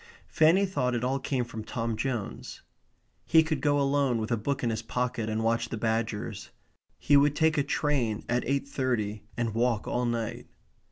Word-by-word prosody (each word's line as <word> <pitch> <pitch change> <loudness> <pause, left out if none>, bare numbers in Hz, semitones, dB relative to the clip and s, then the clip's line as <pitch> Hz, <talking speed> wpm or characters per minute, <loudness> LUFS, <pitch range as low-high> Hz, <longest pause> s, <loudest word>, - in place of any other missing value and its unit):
Fanny 165 +6 +4
thought 130 -10 -1
it 120 - -2
all 130 +2 0
came 130 -3 -1
from 115 -2 -7
Tom 115 0 -3
Jones. 120 -2 -4 0.6
He 160 -1 +5
could 155 -3 -2
go 145 0 +2
alone 140 -3 +2
with 110 +1 -3
a - - +4
book 135 +5 -2
in 120 - +1
his 110 0 -2
pocket 120 -1 -2
and 110 +1 -1
watch 115 +1 +1
the 115 - -4
badgers. 110 -2 -2 0.5
He 145 - +3
would 145 +1 +5
take 160 -1 +3
a 145 - +3
train 135 -7 0
at 120 +1 0
eight 140 0 0
thirty 110 -7 -2
and 115 -2 -1
walk 115 -1 0
all 125 0 0
night. 115 -2 -3
125 Hz, 185 wpm, -28 LUFS, 115-140 Hz, 0.6 s, He